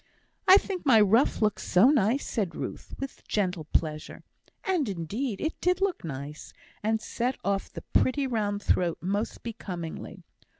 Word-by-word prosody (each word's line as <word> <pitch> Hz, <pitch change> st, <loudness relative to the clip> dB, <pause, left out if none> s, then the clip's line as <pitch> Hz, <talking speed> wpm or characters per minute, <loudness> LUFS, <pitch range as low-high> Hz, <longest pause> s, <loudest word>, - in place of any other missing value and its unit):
"I 375 Hz, -, +10 dB
think 385 Hz, -3 st, -3 dB
my 250 Hz, -6 st, +6 dB
ruff 220 Hz, +3 st, +4 dB
looks 210 Hz, -1 st, +1 dB
so 215 Hz, +10 st, +5 dB
nice," 255 Hz, 0 st, +2 dB
said 200 Hz, -7 st, -2 dB
Ruth, -, -, -6 dB
with 275 Hz, 0 st, -7 dB
gentle 180 Hz, -6 st, -1 dB
pleasure. 155 Hz, -1 st, -2 dB, 0.4 s
And 355 Hz, -, 0 dB
indeed 200 Hz, -, -3 dB
it 315 Hz, -, -3 dB
did 360 Hz, +1 st, +2 dB
look 390 Hz, -2 st, 0 dB
nice, 145 Hz, -1 st, -7 dB, 0.3 s
and 220 Hz, +1 st, +1 dB
set 245 Hz, +4 st, -2 dB
off 200 Hz, 0 st, -1 dB
the -, -, -8 dB
pretty 270 Hz, +2 st, +3 dB
round 210 Hz, -5 st, -1 dB
throat 175 Hz, -2 st, +2 dB
most 200 Hz, +5 st, -2 dB
becomingly. 180 Hz, -8 st, -6 dB
215 Hz, 155 wpm, -28 LUFS, 180-270 Hz, 0.4 s, I